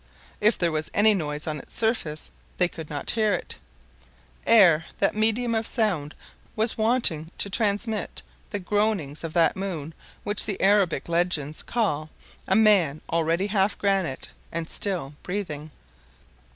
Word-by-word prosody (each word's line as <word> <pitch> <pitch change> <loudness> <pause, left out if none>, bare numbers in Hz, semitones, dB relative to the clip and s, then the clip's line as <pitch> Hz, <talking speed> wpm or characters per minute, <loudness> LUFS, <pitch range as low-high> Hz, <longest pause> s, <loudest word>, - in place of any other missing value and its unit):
If 215 +2 +3
there 170 -2 +1
was 155 0 -2
any 215 +1 +6
noise 150 -5 -3
on 155 -1 -3
its - - -12
surface, 220 -10 -1 0.3
they 180 - +3
could 160 -3 -9
not 145 -1 -2
hear 215 -3 +2
it. - - -6 0.9
Air, 175 -8 +6
that 195 - +2
medium 225 +2 +2
of 225 0 0
sound, 185 - 0 0.4
was 220 +1 +1
wanting 220 -9 +2
to 200 - 0
transmit 215 +1 -1 0.3
the 205 - -3
groanings 200 -7 -1
of 165 -1 -5
that 165 -1 +3
moon 170 -5 -4 0.3
which 205 0 +1
the 200 - -3
Arabic 195 -7 +2
legends 165 -3 0
call 155 -10 -1 0.4
"a - - +2
man 195 -9 +4
already 165 +3 +1
half 205 -1 +1
granite, 195 -9 -1 0.2
and 165 -1 -3
still 180 -9 -2
breathing." 155 -6 -5
190 Hz, 145 wpm, -25 LUFS, 155-215 Hz, 0.9 s, any